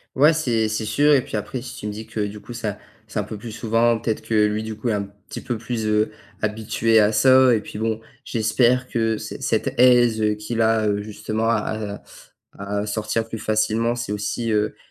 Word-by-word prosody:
Ouais, 150 +4 +6
c'est 120 -8 0
c'est 110 0 -2
sûr 145 +8 +3
et 135 - +5
puis - - -7
après 105 +4 -3
si 130 - -8
tu 105 - -6
me - - -2
dis 110 +2 -8
que 110 - -4
du 105 +1 -7
coup 105 +4 -10
ça 105 -3 -4 0.3
c'est 110 0 -4
un - - 0
peu 105 0 -7
plus 115 +2 -8
souvent, 115 +1 +2
ou - - -4
peut-être 110 -2 -1
que 115 - -4
lui 105 +1 -1
du 110 0 -5
coup, 115 +3 -4
est 110 - +2
un 100 - -1
petit 100 +1 -10
peu 120 -3 -3
plus, 115 -1 -3
heu, 105 0 +2 0.3
habitué 110 +1 +1
à 105 +1 +3
ça 130 +3 +6
et 110 - +2
puis 105 - -9
bon 110 0 -1 0.2
j'espère 120 +3 +2
que 115 -1 0
c - - -7
cette - - -1
aise, 120 -3 +5
heu, 105 0 +2
qu'il 110 +2 -3
a, 110 -1 +3
heu, 105 0 0
justement 110 +2 -2
à 110 -2 -2 0.6
à 100 +1 -4
à - - -4
sortir 110 +2 -2
plus 115 - -5
facilement, 110 +2 +1
c'est 120 -3 -4
aussi, 105 +2 -2
heu, 105 0 0
110 Hz, 230 wpm, -22 LUFS, 105-115 Hz, 0.6 s, Ouais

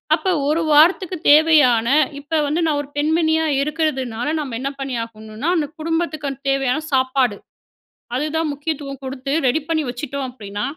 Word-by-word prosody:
அப்ப, 380 - -3 0.2
1 315 +2 +1
வாரத்துக்கு 340 +5 +4 0.2
தேவையான, 295 -7 +5 0.3
இப்ப 305 +2 -1
வந்து 310 +4 0
நான் 290 -2 +1
ஒரு 285 - -11
பெண்மணியா 320 +1 +2 0.2
இருக்கிறதுனால, 275 -6 -2
நம்ம 270 -6 -4
என்ன 275 - -2
பண்ணியாகணும்னா, 230 0 -4
அந்த 295 -2 0
குடும்பத்துக்கு, 320 -3 -2
அந்த 270 - -9
தேவையான 270 +2 +1
சாப்பாடு. 260 -4 +2 0.8
அதுதான் 310 +3 -1
முக்கியத்துவம் 285 -2 -5
குடுத்து 265 +1 -5 0.2
ரெடி 265 +6 +1
பண்ணி 315 -2 +1
வச்சுட்டோம் 270 +2 -4
அப்படீன்னா 205 -4 -6
285 Hz, 140 wpm, -20 LUFS, 255-315 Hz, 0.8 s, தேவையான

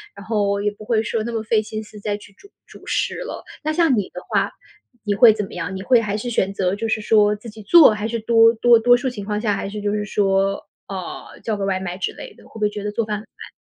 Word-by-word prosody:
然 200 - -11
后 200 -2 0
也 210 - +1
不 205 - -13
会 220 0 +1
说 225 -1 -2
那 235 - -4
么 225 -1 -2
费 220 -1 +2
心 215 0 -6
思 215 0 -13
再 205 0 -2
去 205 -1 -16
煮 400 - -19 0.2
主 - - -15
食 - - -1
了。 - - -6 0.2
那 310 - 0
像 310 -6 +3
你 205 - -1
的 - - -9
话， - - 0 0.5
你 205 -1 0
会 225 +2 +8
怎 210 -1 -3
么 - - -13
样？ 180 +2 -4
你 190 - -5
会 240 +4 +4
还 210 -2 -2
是 245 +3 -4
选 195 -4 0
择 190 -1 0
就 225 +2 -3
是 220 - 0
说 210 -1 +3
自 230 +2 -10
己 215 0 -12
做 310 +5 +8
还 210 0 -4
是 230 +1 -3
多 225 +1 +5
多 235 +1 +5
多 245 +2 +5
数 260 +2 -2
情 210 -5 -7
况 210 0 -2
下 210 -2 0
还 195 - -4
是 210 +1 -6
就 205 0 -1
是 210 0 -1
说， 195 -1 0 0.2
呃， 190 -3 -7
叫 220 - -2
个 200 -1 -3
外 190 -1 0
卖 180 -1 -5
之 190 - -2
类 - - -10
的， - - -20
会 - - -22
不 - - -7
会 210 -1 +2
觉 205 -1 -7
得 210 - -3
做 225 +2 -1
饭 210 -1 -2
很 - - -8
慢。 220 - -13
210 Hz, 310 characters per minute, -21 LUFS, 200-225 Hz, 0.5 s, 会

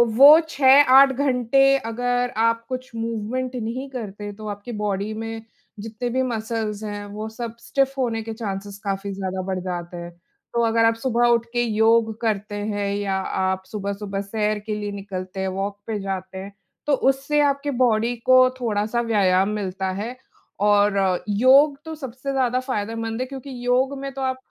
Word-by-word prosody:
वो 285 +5 +9
6-8 270 -1 +7
घंटे 265 -1 +1 0.2
अगर 245 +1 -1
आप 230 +1 +1
कुछ 255 0 -5
मूवमेंट 230 +3 -3
नहीं 250 +3 -4
करते 210 -5 -6
तो 215 +1 -9
आपकी 205 +3 -6
बॉडी 205 +1 -2
में 225 +1 -5 0.4
जितने 225 +3 -4
भी 260 +2 0
मसल्स 220 -3 -3
हैं 205 -1 -5
वो 215 +1 -5
सब 230 0 -6
स्टिफ 270 +2 0
होने 235 -4 -1
के 225 0 -5
चांसेज़ 200 -2 -6
काफ़ी 200 0 -3
ज़्यादा 190 -1 -3
बढ़ 190 -1 -1
जाते 175 -1 -5
हैं। 170 0 -7 0.4
तो 235 - +1
अगर 230 0 +3
आप 225 - +3
सुबह 240 0 +1
उठ 235 -1 +3
के 240 - +1
योग 225 0 +3
करते 210 -2 -1
हैं 205 -1 -2
या 200 -1 -1 0.3
आप 190 0 -1
सुबह-सुबह 200 -1 -4
सैर 210 +1 -1
के 215 -1 -2
लिए 205 -1 -4
निकलते 190 -2 -6
हैं, 190 - -1
वॉक 195 +2 -3
पे 215 -2 -2
जाते 190 -1 -5
हैं, 195 +1 -8 0.3
तो 295 - +3
उससे 270 +2 +1
आपकी 285 0 +1
बॉडी 235 0 +2
को 255 0 +6
थोड़ा-सा 220 0 0
व्यायाम 195 -4 +2
मिलता 190 -1 -3
है। 235 +4 -5 0.5
और 205 -1 +4 0.3
योग 270 +7 +5
तो 320 - -6
सबसे 265 -1 -6
ज़्यादा 255 -2 +1
फ़ायदेमंद 225 -2 -3
है - - 0
क्योंकि 270 0 -8 0.2
योग 260 +3 +2
में 275 0 -5
तो 270 - -6
आप 260 -1 -1
225 Hz, 170 wpm, -23 LUFS, 205-255 Hz, 0.5 s, वो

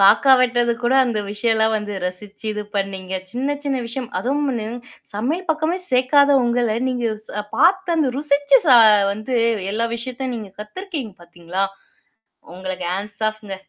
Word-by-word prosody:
காக்கா 230 +7 +6
வெட்டதுக்கு 240 -1 +1
கூட 250 +2 +3
அந்த 235 -4 -1
விஷயம் 220 +2 0
எல்லாம் 220 0 +2
வந்து 210 -1 -4
ரசிச்சு 200 +4 -8
இது 210 0 -4
பண்ணீங்க. 190 -1 -3 0.2
சின்ன 270 +5 -1
சின்ன 275 -2 0
விஷயம் 240 +1 -5
அதுவும் 250 -4 -1 0.4
சமையல் 290 - -2
பக்கமே 320 +3 0
சேர்க்காத 270 +3 +4
உங்கள 235 -2 +1
நீங்க 245 -2 -1 0.2
ஸ் - - -12 0.3
பார்த்து 360 0 +3
அந்த 305 -4 +2
ருசிச்சு 290 +8 +4
ச - - +2 0.4
வந்து 215 +5 -3 0.3
எல்லா 230 +3 0
விஷயத்தையும் 255 +1 -4
நீங்க 215 -4 -8
கத்துருக்கீங்க 275 - -6
பாத்தீங்களா? 175 +2 -4 0.9
உங்களுக்கு 185 -1 -5
ஹேண்ட்ஸ் 205 +2 -6
ஆஃப்ங்க. 215 -2 -9
235 Hz, 145 wpm, -21 LUFS, 210-275 Hz, 0.9 s, காக்கா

